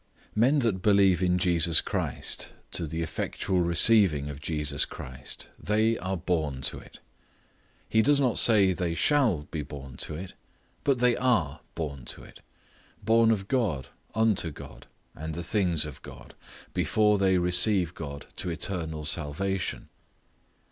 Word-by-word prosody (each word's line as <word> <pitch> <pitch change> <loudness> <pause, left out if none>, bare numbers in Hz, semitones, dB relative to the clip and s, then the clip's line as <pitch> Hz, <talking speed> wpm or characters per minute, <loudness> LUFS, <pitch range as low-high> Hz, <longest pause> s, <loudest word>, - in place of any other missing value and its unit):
Men 125 +7 +3
that 95 -5 0
believe 100 -3 +4
in 90 -1 +2
Jesus 85 -2 +4
Christ - - -3 0.2
to 85 - -3
the 80 +2 -3
effectual 90 +3 -2
receiving 85 -4 +4
of 70 0 -10
Jesus 75 -2 -1
Christ, 65 +3 -8
they 110 +2 +1
are 95 +1 -3
born 80 -6 -2
to - - -1
it. - - -15 0.9
He 110 - +3
does 145 +4 +3
not 130 -4 +2
say 100 -5 +5
they 85 -2 -2
shall 120 - +2
be 80 - -3
born 70 -2 -9
to 75 - -4
it, 90 +3 -7 0.5
but 140 -2 +2
they 125 0 +3
are 115 - +1 0.2
born 70 -6 -5
to - - -6
it; - - -15 0.6
born 115 +2 +4
of 100 -4 0
God, 100 - -1 0.3
unto 110 -6 +2
God, 75 - -12 0.3
and 80 +1 -6
the 85 - -4
things 85 -5 0
of 75 -3 -9
God, - - -12 0.4
before 105 -1 +2
they 95 -1 +3
receive 90 0 +2
God 70 -4 -7
to 90 - -2
eternal 80 -3 -3
salvation. 85 +5 -2
90 Hz, 150 wpm, -27 LUFS, 75-105 Hz, 0.9 s, say